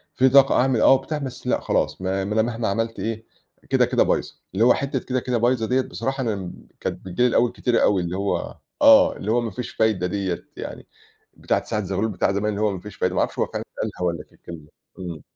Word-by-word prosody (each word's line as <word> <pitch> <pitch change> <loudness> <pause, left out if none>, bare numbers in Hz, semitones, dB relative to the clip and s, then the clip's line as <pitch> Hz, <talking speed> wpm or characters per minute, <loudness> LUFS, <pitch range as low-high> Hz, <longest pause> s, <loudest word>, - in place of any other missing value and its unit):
في 130 +1 +4
طاقة 135 +1 +6
أعمل، 125 -3 +2
آه، - - +7
وبتاع، 150 +3 -1
بس 130 -4 -7
لأ - - +2
خلاص، - - -1
ما 95 +1 -1
ما 105 - -2
أنا 110 - +3
مهما 115 0 -2
عملت 115 +3 -2
إيه، 110 0 -4 0.4
كده، - - +4
كده - - +2
بايظة. - - -1 0.2
اللي 110 +5 +3
هو 125 - +7
حتة 135 -1 -2
كده، 130 +1 -2
كده 125 -1 -1
بايظة 120 0 +1
ديّة 130 +3 +2
بصراحة، 135 +1 -4
أنا 100 -7 -3 0.3
كانت - - -4
بتيجي 90 +5 -4
لي 125 - +6
الأوّل 120 0 +2
كتير 120 -2 +1
أوي. 95 -3 +3
اللي 85 +2 -3
هو 100 0 -2 0.2
آه، 280 -1 +7
اللي 105 +3 -3
هو 120 - +2
ما 115 -3 -4
فيش 125 +6 -5
فايدة 110 -5 +1
ديّة 95 -2 -3
يعني - - -8 0.5
بتاعة - - -1
سعد 105 -1 -2
زغلول 100 +3 -1
بتاع 100 - 0
زمان، 105 +2 -1
اللي 105 +1 -3
هو 105 -1 +2
"ما 95 - -5
فيش 105 +1 -11
فايدة." 90 0 -1
ما - - +2
اعرفش - - -2
هو - - +3
فعلًا - - -5 0.2
قالها - - -5
والّا 85 -2 -3
كانت - - -27
كلمة. 80 -3 -9 0.3
إمم. 85 -5 -6
110 Hz, 240 wpm, -23 LUFS, 95-125 Hz, 0.5 s, آه